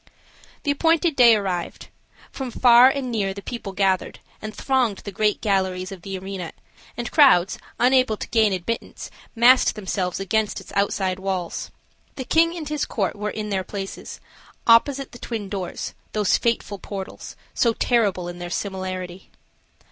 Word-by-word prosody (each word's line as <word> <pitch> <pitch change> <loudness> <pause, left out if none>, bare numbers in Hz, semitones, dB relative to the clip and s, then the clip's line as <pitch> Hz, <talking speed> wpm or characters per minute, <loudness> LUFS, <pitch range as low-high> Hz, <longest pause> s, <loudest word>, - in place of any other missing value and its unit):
The 285 - +1
appointed 325 +2 +2
day 240 -3 +7
arrived. 185 -4 -4 0.4
From 265 -2 -5
far 245 +1 +7
and 265 -2 -3
near 195 -4 -1
the 200 - -8
people 235 -5 -6
gathered, 190 -1 0 0.2
and 215 - -5
thronged 250 -4 0
the 200 - -6
great 210 +1 0
galleries 190 -2 0
of 190 -3 -9
the 195 +1 -5
arena, 190 -2 -6 0.4
and 240 0 -4
crowds, 225 - +5 0.2
unable 255 -3 +3
to - - -6
gain 220 -2 +3
admittance, 190 +5 -4 0.2
massed 245 +3 +5
themselves 190 -3 -3
against 210 +2 0
its - - -13
outside 190 -2 0
walls. 190 -3 -3 0.5
The 260 - -5
king 335 +5 +2
and 310 -3 -6
his 300 -1 -1
court 200 -5 -2
were 210 +1 -3
in 210 0 -5
their 190 -1 0
places, 195 0 -7 0.5
opposite 265 +4 +4
the 240 - -12
twin 215 -4 -5
doors, 190 -3 -5 0.2
those 210 -3 +2
fateful 220 -4 -1
portals, 195 -1 -7 0.2
so 235 - +2
terrible 205 -8 +1
in 175 0 -7
their 175 0 -6
similarity. 185 -1 -5
210 Hz, 155 wpm, -23 LUFS, 190-240 Hz, 0.5 s, day